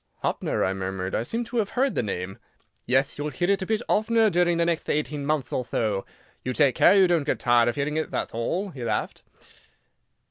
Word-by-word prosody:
"Hoppner," - - 0
I 95 - 0
murmured, 95 0 -4
"I - - +1
seem 230 - -2
to 235 +1 -5
have 210 -3 +1
heard 270 +1 +2
the - - 0
name." 95 -3 -4 0.5
"Yeth; 135 +3 +1
you'll 150 +1 -2
hear 175 +7 0
it 200 - +1
a 190 - -3
bit 220 +1 0
oftener 220 0 +3
during 175 0 +2
the 170 - +2
next 170 -1 -1
eighteen 150 -1 -1
month 150 -3 -1
or 125 - 0
tho. 105 -4 -2 0.4
You 130 - -2
take 140 -1 +3
care - - +5
you 190 - +7
don't 175 -3 +2
get - - -1
tired 120 -1 +3
of - - -3
hearing 145 +2 -1
it, 155 - -1
thath - - -3
all," 175 - -2
he 130 -6 -8
laughed. 115 - -2
150 Hz, 220 wpm, -25 LUFS, 120-190 Hz, 0.5 s, you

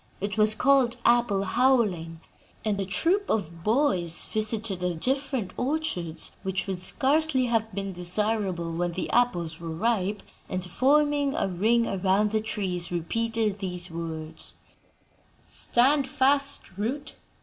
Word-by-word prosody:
It 205 +1 -3
was 215 0 +4
called 255 -1 +3
'Apple 235 -5 +3
Howling,' 195 -8 +1 0.4
and 205 -2 0
a - - -2
troop 350 - 0
of 170 -6 -2
boys 200 - +2
visited 215 -2 -1
the 180 -1 -1
different 265 - -2
orchards 255 - -2
which 190 -1 -2
would 190 -2 -3
scarcely 270 - +2
have 225 -2 0
been 195 0 -3
desirable 180 -1 -1
when 175 +1 -1
the 185 - -3
apples 175 -10 +1
were 165 -1 -6
ripe 205 +3 -1 0.3
and, 185 0 -3
forming 285 - +2
a - - 0
ring 220 +6 +2
around 195 +2 +1
the 215 0 +1
trees, 185 -5 -3
repeated 220 +4 -1
these 180 -2 -5
words: 160 -1 -7 0.9
"'Stand 270 +3 +2
fast, 275 -5 +1
root! 270 +7 -3
210 Hz, 130 wpm, -26 LUFS, 180-250 Hz, 0.9 s, was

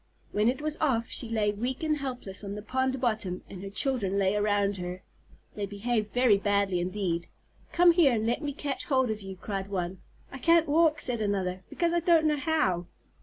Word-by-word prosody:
When 210 +2 +2
it 260 +4 -2
was 305 0 -1
off 245 -6 +1
she 235 - -2
lay 215 -2 +1
weak 245 +7 -3
and 305 -1 +1
helpless 250 -8 -5
on 200 0 -5
the 210 - -7
pond 260 +2 -1
bottom, 215 -7 -1
and 185 - -9
her 195 - -6
children 205 -3 0
lay 195 0 +2
around 205 -1 +1
her. 180 0 -5 0.5
They 205 -1 -3
behaved 215 +1 -2
very 245 -5 +4
badly 200 -2 +1
indeed. 180 -2 -2 0.4
"Come 350 0 +6
here 335 -5 +5
and 220 -1 0
let 235 +5 0
me 295 -2 -2
catch 285 0 -4
hold 260 -5 +2
of 215 -1 -4
you," 195 -1 -7
cried 195 +1 -5
one. 185 -1 -3 0.3
"I 265 - -8
can't 335 +3 +4
walk," 310 0 +3
said 240 -3 -1
another, 190 -3 -1
"because 340 -1 0
I 345 - +3
don't 335 -2 +4
know 300 -1 +2
how." 280 - 0
220 Hz, 205 wpm, -28 LUFS, 195-275 Hz, 0.5 s, Come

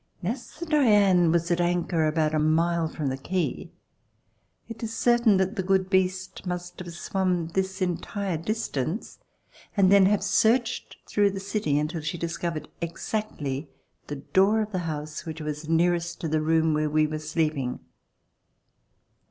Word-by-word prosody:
As 235 - -4
the 340 - -4
Diane" 205 - +4
was 170 +1 +1
at 175 0 +2
anchor 175 -2 +1
about 155 0 +1
a 155 - +2
mile 165 +2 +2
from 155 -1 -5
the 130 - -3
quay, 180 +6 -2 1.0
it 230 -1 -9
is 225 0 -4
certain 240 -4 +4
that 190 +3 0
the - - +1
good 190 0 +1
beast 185 -1 0
must 180 0 -5
have 175 -2 -7
swum 180 -1 -1
this 190 +2 -1
entire 185 +1 -2
distance 170 - -3 0.6
and 190 -1 +5
then 200 -1 +7
have 205 -1 +2
searched 225 +4 +1
through 205 -1 +2
the 195 0 -5
city 195 -7 -1
until 155 +2 -1
she 155 +3 -3
discovered 170 -2 -3
exactly 165 -5 -3 0.4
the 145 - -4
door 195 +9 +2
of 215 0 -3
the 185 - -1
house 150 0 -5
which 160 0 -5
was 150 0 -5
nearest 175 +1 +1
to 165 - -2
the 155 0 +1
room 160 0 +2
where 150 0 +1
we 155 +1 +3
were 155 0 -3
sleeping. 155 -5 -1
175 Hz, 160 wpm, -26 LUFS, 155-195 Hz, 1.0 s, then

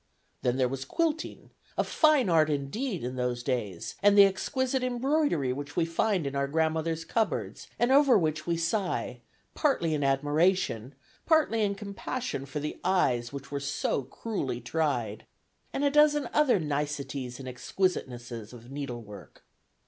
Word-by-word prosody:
Then 125 0 +1
there 130 -1 +3
was 135 +1 -4
quilting, 320 - -2 0.3
a - - +3
fine 305 -7 +3
art 160 -3 +4
indeed 165 - -2
in 125 +1 -4
those 125 -1 -1
days, 110 -9 -3
and 205 0 +5
the 200 - +10
exquisite 260 +7 0
embroidery 250 - +1
which 145 +2 -7
we 170 - +2
find 180 +1 0
in 140 0 -3
our 140 0 +1
grandmothers' 160 +2 0
cupboards, 225 -2 -2
and 240 +2 +2
over 275 -3 +6
which 155 -3 -1
we 170 -1 +1
sigh 180 +4 -1 0.3
partly 220 - +1
in 145 -2 0
admiration, 145 - +1 0.3
partly 310 -9 +3
in 200 -1 +1
compassion 200 - -4
for 150 +2 -4
the 150 +1 -5
eyes 125 -11 +1
which 140 0 -8
were 140 - -2
so 140 0 -1
cruelly 135 - -4
tried; 120 -5 -2 0.4
and 280 - -2
a 285 - +3
dozen 295 0 +4
other 290 -9 +4
niceties 145 -4 -3
and 130 - -8
exquisitenesses 125 - -3
of 120 +1 -12
needlework. 120 -8 -8
155 Hz, 150 wpm, -29 LUFS, 130-215 Hz, 0.4 s, the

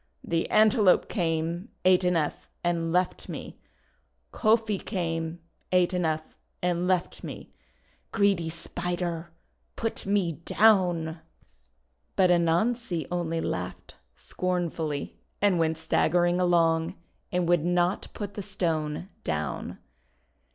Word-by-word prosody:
The 165 -1 -1
Antelope 215 -2 +5
came, 170 +1 -1 0.2
ate 185 0 +5
enough, 170 -4 0
and 170 -1 0
left 180 +1 0
me! - - -7 0.7
Kofi 220 -2 +2
came, 165 -4 -2 0.3
ate 180 0 +3
enough, 160 -3 -1 0.2
and 180 0 0
left 185 -2 0
me! - - -8 0.6
Greedy 200 -6 +2
Spider! 175 0 -4 0.5
Put 225 -3 -3
me 195 -4 +2
down!'' 175 -7 +3 1.0
But 185 -2 +4
Anansi 175 - +1
only 165 -2 -1
laughed - - -4 0.2
scornfully, 165 - -3 0.2
and 200 -4 +3
went 160 -1 +1
staggering 175 +2 +2
along, 165 -1 +2 0.4
and 180 -1 +1
would 175 -3 +3
not 175 +2 +1
put 205 -1 -5
the 205 - -5
Stone 165 -5 -2 0.2
down. 75 -4 -3
175 Hz, 105 wpm, -27 LUFS, 165-185 Hz, 1.0 s, Antelope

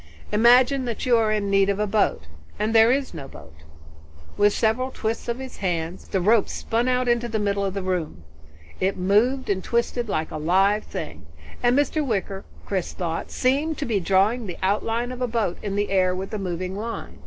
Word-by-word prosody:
"Imagine 245 +5 +5
that 235 +1 -4
you 250 -2 +4
are 220 -2 +2
in 205 -2 -1
need 195 0 +4
of 200 - +1
a 210 - 0
boat, 205 - +1 0.3
and 215 +2 -1
there 225 +1 +6
is 270 -3 -1
no 145 -5 -7
boat." 75 - -13 0.8
With 205 0 +4
several 225 +5 0
twists 225 -3 -4
of 235 0 -2
his 265 -1 -8
hands 175 -2 -3
the 190 - -1
rope 210 +4 +3
spun 235 +2 -1
out 250 0 +1
into 240 0 +1
the 225 -1 -2
middle 200 -1 0
air 200 - 0
of 190 - -5
the 195 - -3
room. 175 - -3 0.6
It 190 +1 0
moved 215 +8 +2
and 190 -2 -1
twisted 235 0 -1
like 155 -4 -2
a - - -4
live 195 +6 +2
thing, - - -7 0.3
and 245 +2 +3
Mr. 295 +2 +1
Wicker, 200 -6 -3 0.2
Chris 190 -3 -2
thought, 165 -2 -4
seemed 285 +5 0
to 290 - -3
be 225 -5 0
drawing 200 +6 +2
the 180 - -6
outline 225 +5 0
of 255 0 -7
a 250 - +1
boat 225 -6 -1
in 200 -1 -3
the 205 -1 -1
air 185 -1 +2
with 190 +1 -5
the 215 - -3
moving 185 0 -4
line. 225 +3 -6
210 Hz, 210 wpm, -24 LUFS, 190-240 Hz, 0.8 s, there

